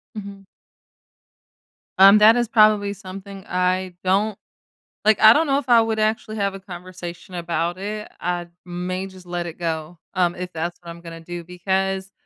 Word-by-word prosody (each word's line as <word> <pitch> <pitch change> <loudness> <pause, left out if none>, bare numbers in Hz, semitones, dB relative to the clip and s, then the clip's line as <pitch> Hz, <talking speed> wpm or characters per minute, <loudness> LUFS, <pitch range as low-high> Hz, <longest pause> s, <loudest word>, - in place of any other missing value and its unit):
Mhm. 200 -1 -8 1.6
Um, 195 +2 +9
that 215 +2 +7
is 240 -1 +1
probably 215 -2 +4
something 195 -1 -10
I 180 0 0
don't 195 +3 +1 0.7
like, 215 0 +4
I 220 +1 +10
don't 320 - +2
know 275 0 +2
if 265 - -9
I 235 -1 +7
would 220 -1 -1
actually 215 0 -1
have 200 -1 -1
a - - -8
conversation 180 -1 -9
about 170 0 -2
it. 210 +2 -5
I 175 0 -2 0.2
may 180 +2 -4
just 185 -1 -14
let 175 0 -3
it 170 0 -8
go, 160 0 -4 0.2
um, 175 -1 +2
if 180 0 -6
that's 170 +2 -4
what 170 - -11
I'm 170 0 -9
gonna 165 -1 -9
do, 175 +1 -7
because, 190 +2 -2
185 Hz, 170 wpm, -22 LUFS, 175-210 Hz, 1.6 s, I